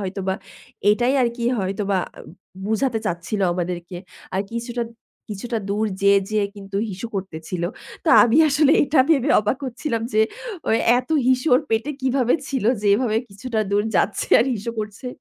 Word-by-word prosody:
হয়তোবা 190 Hz, -1 st, -2 dB, 0.6 s
এটাই 240 Hz, +5 st, +2 dB
আর 240 Hz, -, +3 dB
কি 235 Hz, -, -3 dB
হয়তোবা 195 Hz, 0 st, -1 dB, 0.2 s
আ -, -, -9 dB, 0.5 s
বোঝাতে 225 Hz, +2 st, 0 dB
চাচ্ছিল 175 Hz, +3 st, -3 dB
আমাদেরকে। 175 Hz, 0 st, -4 dB, 0.4 s
আর 190 Hz, -, +1 dB
কিছুটা 235 Hz, +1 st, -3 dB, 0.5 s
কিছুটা 225 Hz, +3 st, -3 dB
দূর 210 Hz, +2 st, 0 dB, 0.2 s
যেয়ে, 200 Hz, 0 st, +5 dB
যেয়ে 210 Hz, -2 st, +1 dB
কিন্তু 195 Hz, 0 st, -7 dB
হিসু 200 Hz, +5 st, -6 dB
করতেছিল। 180 Hz, -2 st, -5 dB, 0.4 s
তো 330 Hz, -, 0 dB
আমি 240 Hz, +3 st, +3 dB
আসলে 290 Hz, +1 st, +4 dB
এটা 285 Hz, 0 st, +3 dB
ভেবে 285 Hz, -1 st, +3 dB
অবাক 210 Hz, +6 st, -1 dB
হচ্ছিলাম 240 Hz, -2 st, -3 dB
যে 215 Hz, -, +3 dB, 0.5 s
ওই 220 Hz, -, +4 dB, 0.2 s
এত 255 Hz, -, -7 dB, 0.2 s
হিসু 255 Hz, +2 st, +2 dB
ওর 255 Hz, -, +4 dB
পেটে 225 Hz, +6 st, 0 dB
কিভাবে 255 Hz, -2 st, +2 dB
ছিল? 265 Hz, -6 st, -2 dB, 0.2 s
যে 210 Hz, -, -2 dB
এভাবে 220 Hz, -1 st, 0 dB
কিছুটা 220 Hz, +3 st, -3 dB
দূর 205 Hz, +1 st, +2 dB
যাচ্ছে 200 Hz, -, +1 dB
আর 240 Hz, -, +2 dB
হিসু 225 Hz, +2 st, -4 dB
করছে। 215 Hz, +4 st, -5 dB
220 Hz, 160 wpm, -22 LUFS, 195-250 Hz, 0.6 s, যেয়ে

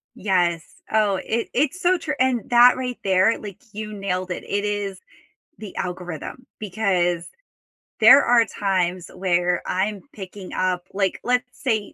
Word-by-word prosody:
Yes, 175 Hz, -4 st, -1 dB
oh, 215 Hz, -2 st, +2 dB
it 230 Hz, +1 st, -1 dB
it's 295 Hz, +7 st, 0 dB
so 365 Hz, +1 st, +3 dB
true, 305 Hz, -3 st, -4 dB
and 255 Hz, -2 st, +2 dB
that 245 Hz, +1 st, +7 dB
right 250 Hz, -1 st, -4 dB
there, 190 Hz, +3 st, +3 dB
like, 200 Hz, -3 st, -9 dB
you 215 Hz, +1 st, -6 dB
nailed 185 Hz, -2 st, -3 dB
it, -, -, -4 dB
it 205 Hz, +1 st, -2 dB
is 205 Hz, -2 st, -3 dB, 0.6 s
the 210 Hz, -4 st, -10 dB
algorithm, 180 Hz, -, -6 dB
because 180 Hz, -5 st, 0 dB, 0.7 s
there 255 Hz, +6 st, +8 dB
are 235 Hz, -1 st, +4 dB
times 185 Hz, -4 st, -1 dB
where 180 Hz, -1 st, +1 dB
I'm 195 Hz, +2 st, -1 dB
picking 190 Hz, -1 st, -9 dB
up, 180 Hz, -1 st, -1 dB
like, 195 Hz, -1 st, 0 dB
let's 250 Hz, +1 st, +1 dB
say, 220 Hz, -7 st, -1 dB
200 Hz, 145 wpm, -22 LUFS, 185-230 Hz, 0.7 s, there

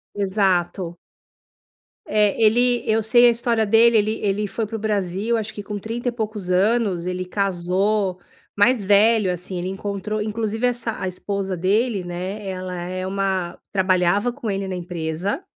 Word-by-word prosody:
Exato. 190 Hz, -3 st, 0 dB, 1.1 s
É, 210 Hz, 0 st, +2 dB
ele 240 Hz, +2 st, +3 dB
eu 220 Hz, 0 st, +2 dB
sei 240 Hz, +3 st, +5 dB
a -, -, +7 dB
história 230 Hz, -1 st, +1 dB
dele, 225 Hz, +2 st, +5 dB
ele 215 Hz, 0 st, +2 dB
ele 205 Hz, 0 st, 0 dB
foi 220 Hz, +1 st, -3 dB
para 225 Hz, -, -6 dB
o 225 Hz, -, -3 dB
Brasil 205 Hz, +1 st, -1 dB
acho 220 Hz, 0 st, -3 dB
que 205 Hz, -, -7 dB
com 205 Hz, 0 st, -5 dB
trinta 235 Hz, +4 st, -5 dB
e -, -, -3 dB
poucos 215 Hz, -5 st, -4 dB
anos, 195 Hz, -2 st, +2 dB
ele 185 Hz, 0 st, -3 dB
casou 190 Hz, +1 st, 0 dB, 0.4 s
mais 210 Hz, 0 st, +3 dB
velho, 205 Hz, -1 st, +4 dB
assim, 180 Hz, +1 st, -5 dB
ele 180 Hz, +1 st, -3 dB
encontrou 200 Hz, +2 st, -3 dB
inclusive 220 Hz, +2 st, -1 dB
essa 235 Hz, -2 st, -2 dB
a 185 Hz, -, -1 dB
esposa 190 Hz, 0 st, -3 dB
dele, 205 Hz, +3 st, +1 dB
né, 185 Hz, +4 st, -5 dB
ela 185 Hz, -1 st, -4 dB
é 185 Hz, +1 st, -4 dB
uma 190 Hz, -2 st, -1 dB
trabalhava 190 Hz, +3 st, +2 dB
com 235 Hz, -5 st, -4 dB
ele 195 Hz, 0 st, -2 dB
na 185 Hz, -, -3 dB
empresa 175 Hz, -, -3 dB
200 Hz, 160 wpm, -22 LUFS, 185-220 Hz, 1.1 s, a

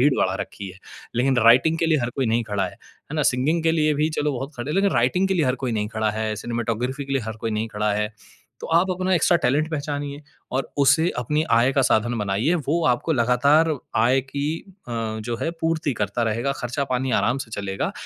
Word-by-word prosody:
भीड़ 140 Hz, +2 st, +5 dB
बढ़ा 95 Hz, 0 st, +1 dB
रखी 100 Hz, -1 st, -6 dB
है, 95 Hz, -, -15 dB, 0.4 s
लेकिन 130 Hz, +1 st, +2 dB
राइटिंग 140 Hz, +8 st, +5 dB
के 165 Hz, -, +1 dB
लिए 155 Hz, -2 st, +3 dB
हर 120 Hz, -, -1 dB
कोई 130 Hz, -3 st, +1 dB
नहीं 115 Hz, +1 st, +1 dB
खड़ा 100 Hz, -2 st, +1 dB
है। -, -, -8 dB, 0.4 s
है -, -, -5 dB
ना? 150 Hz, -, +2 dB
सिंगिंग 145 Hz, +5 st, +1 dB
के 165 Hz, 0 st, +3 dB
लिए 155 Hz, -2 st, +2 dB
भी, 150 Hz, +2 st, +1 dB
चलो, 150 Hz, -1 st, -1 dB
बहुत 135 Hz, +4 st, -5 dB
खड़े 120 Hz, +5 st, -4 dB
हैं, -, -, -2 dB
लेकिन 195 Hz, 0 st, +3 dB
राइटिंग 135 Hz, +11 st, +2 dB
के 190 Hz, -, +1 dB
लिए 160 Hz, -6 st, +2 dB
हर 125 Hz, -, +2 dB
कोई 120 Hz, -, -1 dB
नहीं 105 Hz, -1 st, -1 dB
खड़ा 110 Hz, -1 st, -1 dB
है, 110 Hz, 0 st, -2 dB
सिनेमेटोग्राफ़ी 120 Hz, +4 st, -3 dB
के 135 Hz, -, -5 dB
लिए 135 Hz, -3 st, +1 dB
हर 110 Hz, 0 st, -6 dB
कोई 115 Hz, -, 0 dB
नहीं 110 Hz, +1 st, -2 dB
खड़ा 105 Hz, 0 st, -1 dB
है। 105 Hz, +1 st, -1 dB, 0.5 s
तो -, -, -6 dB
आप 180 Hz, +3 st, +4 dB
अपना 185 Hz, +1 st, 0 dB
एक्स्ट्रा 175 Hz, +1 st, +4 dB
टैलेंट 150 Hz, +2 st, +1 dB
पहचानिए 145 Hz, -1 st, -4 dB, 0.4 s
और 135 Hz, -, -2 dB
उसे 145 Hz, +5 st, +4 dB
अपनी 150 Hz, +6 st, 0 dB
आय 120 Hz, +3 st, +4 dB
का 135 Hz, -, +2 dB
साधन 120 Hz, 0 st, +2 dB
बनाइए, 105 Hz, -, +1 dB
वो 165 Hz, +1 st, 0 dB
आपको 125 Hz, +6 st, +1 dB
लगातार 140 Hz, +6 st, +3 dB, 0.3 s
आय 130 Hz, +3 st, +4 dB
की 140 Hz, +2 st, -4 dB, 0.4 s
अ, 120 Hz, -, -5 dB, 0.3 s
जो 115 Hz, +1 st, -3 dB
है, -, -, 0 dB
पूर्ति 160 Hz, -3 st, 0 dB
करता 110 Hz, +3 st, -1 dB
रहेगा, 115 Hz, +5 st, 0 dB
खर्चा-पानी 130 Hz, +1 st, -2 dB
आराम 125 Hz, +3 st, +1 dB
से 120 Hz, -, -7 dB
चलेगा 95 Hz, -1 st, -3 dB
130 Hz, 225 wpm, -23 LUFS, 115-150 Hz, 0.5 s, भीड़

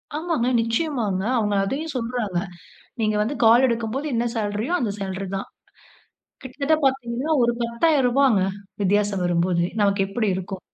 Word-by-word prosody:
ஆமாங்க. 310 Hz, -6 st, -1 dB
நிச்சயமாங்க. 230 Hz, -, -1 dB
அவுங்க 210 Hz, -2 st, 0 dB
அதையும் 290 Hz, +10 st, -3 dB
சொல்றாங்க. 230 Hz, -6 st, -2 dB, 0.6 s
"நீங்க 215 Hz, -1 st, +1 dB
வந்து 235 Hz, +7 st, -1 dB
கால் 235 Hz, +4 st, +6 dB
எடுக்கும்போது 235 Hz, +4 st, -2 dB
என்ன 235 Hz, 0 st, 0 dB
சேலரியோ! 215 Hz, +8 st, -2 dB
அந்த 220 Hz, -4 st, -1 dB
சேலரி 195 Hz, 0 st, -4 dB
தான்." 195 Hz, -, -4 dB, 1.0 s
கிட்டத்தட்ட 280 Hz, +4 st, 0 dB
பார்த்தீங்கன்னா, 265 Hz, +2 st, -1 dB
ஒரு 235 Hz, -, +3 dB
ரூ. -, -, -9 dB
10,000ங்க -, -, +2 dB
பத்தாயிரரூபாங்க 265 Hz, -, +3 dB, 0.4 s
வித்தியாசம் 200 Hz, -1 st, +1 dB
வரும்போது 175 Hz, 0 st, +1 dB, 0.2 s
நமக்கு 200 Hz, 0 st, +2 dB
எப்படி 215 Hz, +2 st, -1 dB
இருக்கும்? 190 Hz, 0 st, -5 dB
230 Hz, 140 wpm, -23 LUFS, 200-265 Hz, 1.0 s, கால்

